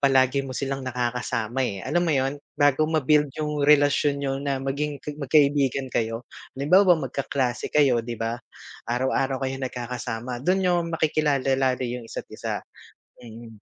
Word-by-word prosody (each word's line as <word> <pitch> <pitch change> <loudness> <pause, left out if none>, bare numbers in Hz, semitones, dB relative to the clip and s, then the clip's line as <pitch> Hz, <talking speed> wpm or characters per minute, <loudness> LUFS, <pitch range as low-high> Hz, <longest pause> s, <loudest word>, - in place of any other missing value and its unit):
palagi 135 -1 +3
mo 130 -2 -6
silang 135 0 -2
nakakasama, 125 -1 -2
eh, 100 -7 -2
alam 160 +6 +1
mo 175 - 0
yun, 140 -1 0 0.2
bago 145 +1 +3
ma-build 150 -1 +3
yung 150 -1 -2
relasyon 145 -1 +3
niyo 135 0 -1
na 140 -1 -1
maging 140 +2 -2 0.2
magkaibigan 140 -2 +2
kayo. 115 +1 -1 0.3
Halimbawa 180 +5 +5
magkaklase 135 -3 -2
kayo, 135 -5 +3
'di 115 0 -6
ba, 115 +2 -3 0.5
araw-araw 130 +2 0
kayo 130 0 -3
nagkakasama 125 -1 -4
dun 185 +7 +1
nyo 175 -1 +3
makikilala 150 -4 +1
lalo 130 -1 +1
yung 120 -1 -5
isa't - - -6
isa. - - -4 0.6
Mm, 115 0 -11
135 Hz, 145 wpm, -25 LUFS, 125-145 Hz, 0.6 s, Halimbawa